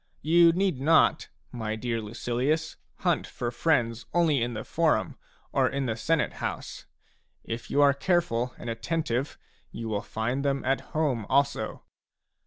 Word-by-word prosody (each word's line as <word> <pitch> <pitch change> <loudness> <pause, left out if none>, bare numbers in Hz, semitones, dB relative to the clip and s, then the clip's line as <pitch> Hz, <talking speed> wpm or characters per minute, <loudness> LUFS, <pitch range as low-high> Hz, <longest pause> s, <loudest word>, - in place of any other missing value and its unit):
You 170 +2 +6
need 180 -6 0
not, 160 +3 +4 0.2
my 110 -3 -3
dear 115 0 -2
Lucilius, 125 +8 -1 0.3
hunt - - +1
for 120 -1 -4
friends 120 -4 0
only 160 -6 +3
in 120 0 -1
the 110 - -4
forum - - +1 0.4
or - - +2
in 140 -1 -2
the 115 -3 -1
Senate 155 +8 0
house; - - -5 0.6
if 115 +1 -6
you 145 - +4
are 140 -1 +6
careful 140 -7 0
and - - -9
attentive, 125 +3 -2 0.3
you 115 0 -6
will 105 -2 -1
find 120 +5 -2
them 140 -1 0
at 135 +1 +1 0.2
home 130 -9 0
also. 140 +1 +1
130 Hz, 150 wpm, -27 LUFS, 115-155 Hz, 0.6 s, You